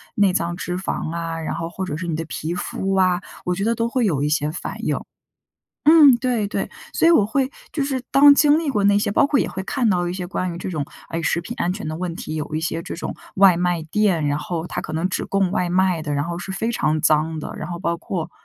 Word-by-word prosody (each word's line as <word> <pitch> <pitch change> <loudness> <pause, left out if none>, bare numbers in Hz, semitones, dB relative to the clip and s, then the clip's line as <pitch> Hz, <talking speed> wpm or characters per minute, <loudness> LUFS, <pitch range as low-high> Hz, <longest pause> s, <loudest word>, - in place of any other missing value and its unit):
内 200 -3 +3
脏 170 0 -1
脂 180 0 -3
肪 180 -3 -3
啊， 165 -1 -3
然 160 - -3
后 165 0 -4
或 190 +2 -4
者 150 -5 -4
是 170 +2 -5
你 165 - -1
的 165 - -3
皮 160 +2 -4
肤 195 +2 -2
啊， 185 -2 +3 0.2
我 180 - +1
觉 195 - -2
得 230 +2 +1
都 230 +1 0
会 245 -1 0
有 145 -8 +1
一 - - +1
些 150 0 +1
反 175 - -6
应。 - - 0 0.9
嗯， 295 -6 +8
对 240 -5 0
对， - - -3 0.2
所 - - +3
以 - - +7
我 270 -11 +5
会 265 +3 0 0.2
就 290 - -1
是 270 -2 -2
当 285 +1 +8
经 295 +1 +5
历 320 -2 -1
过 210 -6 0
那 200 0 +5
些， 205 - 0
包 280 - +4
括 285 -1 +2
也 - - +1
会 190 - -5
看 245 +3 0
到 180 -3 +1
一 175 - -3
些 180 - -4
关 185 0 -2
于 170 - -6
这 175 - -6
种， 155 -4 -2 0.3
哎 165 - -3
食 170 - +1
品 230 +8 -6
安 175 - +1
全 185 -4 -5
的 155 - -3
问 175 -1 -4
题， 155 - -6
有 155 0 -4
一 155 - 0
些 165 0 -2
这 - - -6
种 - - -5 0.2
外 195 -2 +6
卖 175 -1 0
店， 170 -1 +1
然 145 0 0
后 165 +1 -4
它 - - -4
可 - - -7
能 165 +3 0
只 - - -2
供 195 -2 +1
外 180 - 0
卖 180 -2 +2
的， 150 -2 -3
然 145 - 0
后 170 0 -4
是 190 +2 -6
非 225 +4 -1
常 155 -8 0
脏 155 +1 +2
的。 - - -6
然 - - -6
后 175 - -4
包 170 -1 -1
括 170 -1 -4
180 Hz, 290 characters per minute, -22 LUFS, 165-210 Hz, 0.9 s, 嗯